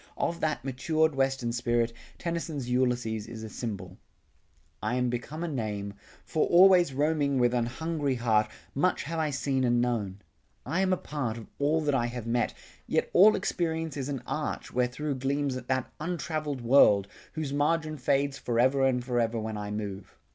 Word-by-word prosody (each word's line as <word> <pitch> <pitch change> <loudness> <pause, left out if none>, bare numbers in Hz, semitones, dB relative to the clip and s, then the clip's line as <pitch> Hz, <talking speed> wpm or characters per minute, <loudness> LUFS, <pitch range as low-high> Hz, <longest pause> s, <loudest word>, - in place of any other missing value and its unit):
Of 170 - -1
that 150 -5 -1
matured 155 +4 +1
Western 135 -3 0
spirit, 120 -1 0 0.2
Tennyson's 165 -6 -3
Ulysses 125 -4 0
is 115 -1 -8
a 110 - -6
symbol. 100 -6 -6 0.4
"... - - -39
I 110 +4 -1
am 125 -1 +1
become 145 +7 -4
a - - -1
name 105 -8 -3 0.3
For 155 - +1
always 180 -2 +6
roaming 145 0 +1
with 120 -1 +3
an 120 -1 +1
hungry 150 0 -2
heart, 110 -3 +2 0.2
Much 180 +7 +1
have 165 +3 -3
I 155 -1 +1
seen 135 -1 0
and 120 -1 +3
known... 110 -6 -1 0.5
I 175 +4 0
am 190 -1 +2
a 185 - +3
part 130 -9 -3
of 115 - -8
all 150 +3 +2
that 150 -2 0
I 120 -3 +2
have 120 -1 -6
met; 120 +1 0 0.3
Yet - - 0
all 210 +4 +7
experience 160 -3 -2
is 140 -1 -3
an 135 -4 -4
arch, 150 +3 -4
where 125 0 +2
thro' 145 +4 -3
Gleams 135 +1 -1
that 130 0 -2
untravelled 155 -4 -3
world, 115 -5 +5 0.3
whose 155 -3 -3
margin 155 +1 0
fades 140 +2 +1
Forever 130 +3 +2
and 125 -2 +2
forever 120 -2 0
when 110 0 -4
I 105 0 -4
move. 105 -2 -6
130 Hz, 175 wpm, -28 LUFS, 120-155 Hz, 0.5 s, all